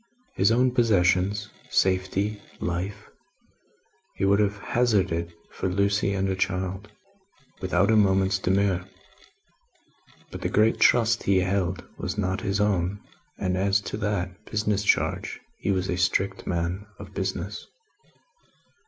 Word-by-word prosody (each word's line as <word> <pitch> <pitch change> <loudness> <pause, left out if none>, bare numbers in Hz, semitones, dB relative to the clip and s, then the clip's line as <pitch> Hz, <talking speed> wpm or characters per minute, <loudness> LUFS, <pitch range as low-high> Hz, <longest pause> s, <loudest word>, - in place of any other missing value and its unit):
His 110 - +3
own 125 +2 +3
possessions, 100 -3 +2 0.2
safety, 95 +3 +1 0.2
life, 90 +3 -3 1.1
he - - 0
would 100 +1 +4
have 105 -1 +1
hazarded 95 -8 0 0.2
for 95 - -2
Lucie 100 +2 +1
and 95 0 0
her 95 - 0
child, 95 +1 -2 0.7
without 95 +2 +2
a - - +4
moment's 95 -2 +3
demur; 95 -1 +1 1.5
but - - -7
the - - -1
great 110 +1 +3
trust 115 -1 +4
he 95 -1 +3
held 95 -1 -1
was - - -3
not 95 -1 -1
his 100 +1 -1
own, 100 -1 +1 0.4
and 90 -1 -1
as 100 +2 +2
to 105 - -5
that 100 -2 -3
business 105 -1 0
charge - - 0 0.2
he - - -3
was 95 -1 +1
a 90 - -1
strict 90 +2 0
man 90 +3 -2
of - - -11
business. - - -4
95 Hz, 130 wpm, -26 LUFS, 95-105 Hz, 1.5 s, would